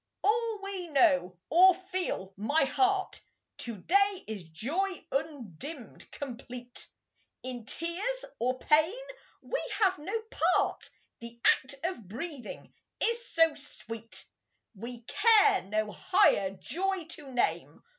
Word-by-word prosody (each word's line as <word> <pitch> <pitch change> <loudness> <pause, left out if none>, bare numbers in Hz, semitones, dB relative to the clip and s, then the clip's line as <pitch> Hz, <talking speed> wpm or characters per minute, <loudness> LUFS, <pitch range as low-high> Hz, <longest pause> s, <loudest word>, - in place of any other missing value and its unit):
all 450 +1 +1
we 390 -3 -3
know, 275 - +3
or 365 +3 +7
feel, 370 - -3
my 275 +11 +2
heart, 385 +7 +1 0.4
To 235 -3 -1
day 395 - +2
is 210 -5 -6
joy 295 - -1 0.2
undimmed, 285 - -4
complete; 250 -2 -5 0.6
In 245 -3 -5
tears 395 - 0
or 255 +2 0
pain 315 - +3 0.5
we - - -2 0.2
have 375 -5 +3
no 395 +9 -2 0.4
part; - - 0 0.3
The 235 0 -6
act 270 +1 +3
of 335 - -3
breathing 270 - -7 0.3
is 470 +1 +1
so 325 -1 +5
sweet, 230 -5 -2 0.5
We 235 +3 -6
care 420 - +5
no 215 +1 -1
higher 195 -1 +3
joy 355 - -2
to 305 -4 -4
name. 245 -1 -1
300 Hz, 115 wpm, -30 LUFS, 235-385 Hz, 0.6 s, or